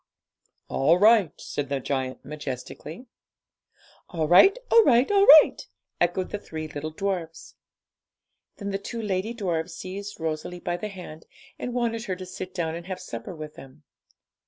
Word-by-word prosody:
'All 155 Hz, +6 st, +3 dB
right,' 210 Hz, -4 st, +4 dB
said 145 Hz, -2 st, -4 dB
the 140 Hz, -1 st, -1 dB
giant 130 Hz, -1 st, -3 dB
majestically. 150 Hz, -, -7 dB, 1.0 s
'All 160 Hz, -4 st, -1 dB
right, 380 Hz, -, +7 dB
all 460 Hz, -1 st, +8 dB
right, 255 Hz, -, +4 dB
all 400 Hz, 0 st, +4 dB, 0.2 s
right,' -, -, -8 dB, 0.3 s
echoed 175 Hz, +1 st, 0 dB
the 210 Hz, -, -3 dB
three 155 Hz, -5 st, -6 dB
little 155 Hz, 0 st, -5 dB
dwarfs. 170 Hz, -1 st, -4 dB, 1.0 s
Then 200 Hz, -1 st, -4 dB
the 195 Hz, -, -2 dB
two 230 Hz, +4 st, -6 dB
lady 210 Hz, +1 st, -2 dB
dwarfs 175 Hz, -5 st, -2 dB
seized 200 Hz, +2 st, -7 dB
Rosalie 160 Hz, +2 st, -4 dB
by 175 Hz, 0 st, -3 dB
the 210 Hz, -, -4 dB
hand, 180 Hz, -5 st, -10 dB, 0.3 s
and 245 Hz, 0 st, -4 dB
wanted 230 Hz, -2 st, -1 dB
her 190 Hz, -4 st, -2 dB
to 185 Hz, 0 st, -8 dB
sit 185 Hz, 0 st, -7 dB
down 165 Hz, -3 st, -2 dB
and 170 Hz, +1 st, -7 dB
have 185 Hz, -1 st, -5 dB
supper 170 Hz, -1 st, -7 dB
with 155 Hz, -1 st, -8 dB
them. 135 Hz, +3 st, -14 dB
180 Hz, 160 wpm, -26 LUFS, 155-205 Hz, 1.0 s, all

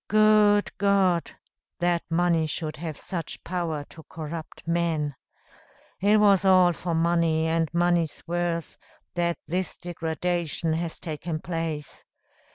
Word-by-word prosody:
Good 215 Hz, -1 st, +4 dB
God! 195 Hz, -4 st, +3 dB, 0.5 s
that 175 Hz, -1 st, +1 dB
money 165 Hz, -1 st, +2 dB
should 155 Hz, 0 st, -4 dB
have 155 Hz, -2 st, -5 dB
such 170 Hz, -5 st, -5 dB
power 170 Hz, -4 st, -2 dB
to 160 Hz, -, -12 dB
corrupt 160 Hz, 0 st, -7 dB
men. 165 Hz, -4 st, 0 dB, 0.9 s
It 205 Hz, +3 st, +4 dB
was 200 Hz, -2 st, +5 dB
all 185 Hz, -2 st, +6 dB
for 170 Hz, +1 st, -3 dB
money, 165 Hz, -1 st, +2 dB
and 165 Hz, -1 st, 0 dB
money's 170 Hz, -2 st, +1 dB
worth, 170 Hz, -1 st, -2 dB, 0.3 s
that 170 Hz, -1 st, 0 dB
this 180 Hz, +3 st, -2 dB
degradation 170 Hz, -1 st, -2 dB
has 165 Hz, 0 st, -3 dB
taken 160 Hz, -1 st, -4 dB
place. 165 Hz, -3 st, -4 dB
170 Hz, 120 wpm, -26 LUFS, 160-180 Hz, 0.9 s, all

